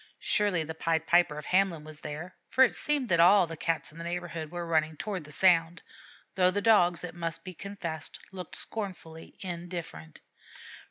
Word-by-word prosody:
Surely 200 -6 +2
the 160 +1 -6
Pied 160 0 0
Piper 175 -3 +3
of 150 - -7
Hamelin 185 -4 +2
was 155 0 -10
there, 160 +6 -7
for 260 - +5
it 255 - +4
seemed 290 -4 0
that 170 -2 +3
all 185 +3 +7
the 165 0 -7
Cats 165 0 -1
in 160 - -13
the - - -5
neighborhood 170 -2 -4
were 175 +1 -5
running 160 -2 +1
toward 190 -5 -4
the 150 - -12
sound, 170 +1 +3 0.5
though 185 -1 +4
the 195 +2 0
Dogs, 180 -6 +4
it 180 - -5
must 165 -1 -5
be 185 - -7
confessed, 170 -4 -6
looked 185 -3 -8
scornfully 180 -7 -6
indifferent. 170 - -6
170 Hz, 180 wpm, -29 LUFS, 160-185 Hz, 0.5 s, all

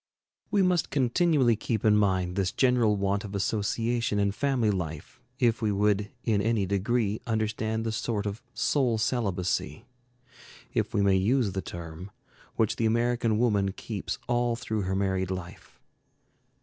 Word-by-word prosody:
We 205 -2 +3
must 180 -2 +2
continually 135 -1 +3
keep 110 0 -2
in 105 -1 +5
mind 95 -3 +1
this 95 -2 0
general 125 -5 +3
want 100 +1 0
of 100 -1 -7
association 110 +2 0
in 100 -1 +2
family 125 -1 +1
life 85 -5 -5 0.2
if 120 -2 +2
we 110 -2 +1
would 105 0 +1
in 105 -3 +1
any 110 -1 +1
degree 105 +2 0
understand 110 0 -1
the 110 - -1
sort 110 -1 -2
of 105 +3 -4
soul 125 -6 +1
celibacy, 100 - -1 0.9
if 110 0 -1
we 100 - +3
may 95 -1 +4
use 110 +2 +2
the 95 +1 -3
term, 85 +1 -8 0.5
which 110 -3 +1
the 115 - +2
American 115 -1 +1
woman 100 -5 +1
keeps 105 -1 -5
all 120 -1 +1
through 110 -2 -3
her 95 - 0
married 95 -1 0
life. 90 -2 -7
110 Hz, 150 wpm, -28 LUFS, 100-120 Hz, 0.9 s, in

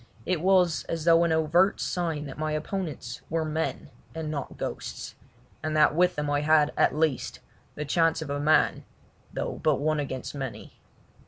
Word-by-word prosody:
It 180 -4 0
was 180 -4 +3
as 165 -1 -4
though 165 0 +6
an 170 - +1
overt 160 +5 +3
sign 165 -4 -2
that 140 +1 -8
my 155 0 -1
opponents 155 - -4
were 160 -1 0
men 155 +1 -3 0.2
and 160 -1 -3
not 140 -3 -5
ghosts, - - -5 0.5
and 155 0 -1
that 150 - +5
with 180 +3 +3
them 150 0 -2
I 145 0 +1
had, 150 0 +4
at - - +3
least, 155 -3 0 0.4
the 150 - -4
chance 165 +2 +2
of 145 - -6
a 145 - -1
man, 155 +2 +3 0.5
though - - -4
but 155 -2 +3
one 155 +1 +1
against 130 -3 -4
many. 135 -4 -6
155 Hz, 175 wpm, -27 LUFS, 150-165 Hz, 0.5 s, though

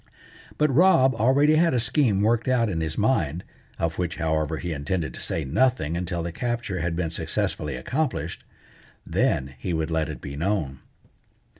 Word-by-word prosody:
But 150 -2 +2
Rob 135 -5 +5
already 140 +7 +4
had 165 -3 +3
a - - +3
scheme 115 -3 +2
worked 115 +3 +2
out 120 -4 +2
in 80 -3 -2
his 80 -1 -3
mind, 90 - +1 0.3
of 85 +1 -2
which, 90 0 -1
however, 80 -1 -1
he 85 +1 -3
intended 80 +3 -2
to - - -8
say 80 - -2
nothing 85 - +1
until 85 -1 -2
the 85 - -3
capture 120 -2 -3
had 85 +1 -1
been 85 -2 -2
successfully 75 -3 -2
accomplished. 130 - -2 0.6
Then 65 +1 0
he 90 - -3
would 80 0 -1
let 80 -1 0
it 75 - -6
be 70 -1 -7
known. 80 -5 -1
90 Hz, 170 wpm, -25 LUFS, 80-125 Hz, 0.6 s, Rob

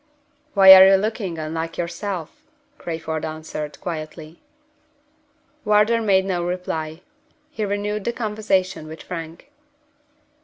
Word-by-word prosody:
"Why 190 -1 +10
are 190 0 +10
you 195 - +6
looking 200 -3 -2
unlike 160 +1 -4
yourself?" 175 - -5 0.4
Crayford 160 -2 -4
answered, 155 -1 -6
quietly. 155 -1 -7 1.2
Wardour 210 +2 +3
made 190 -3 +2
no 180 -3 -1
reply. 175 -2 -4 0.5
He 220 -8 -3
renewed 205 +1 -3
the 235 - 0
conversation 210 -7 -2
with 160 +1 -10
Frank. 170 - -8
180 Hz, 110 wpm, -22 LUFS, 160-205 Hz, 1.2 s, Why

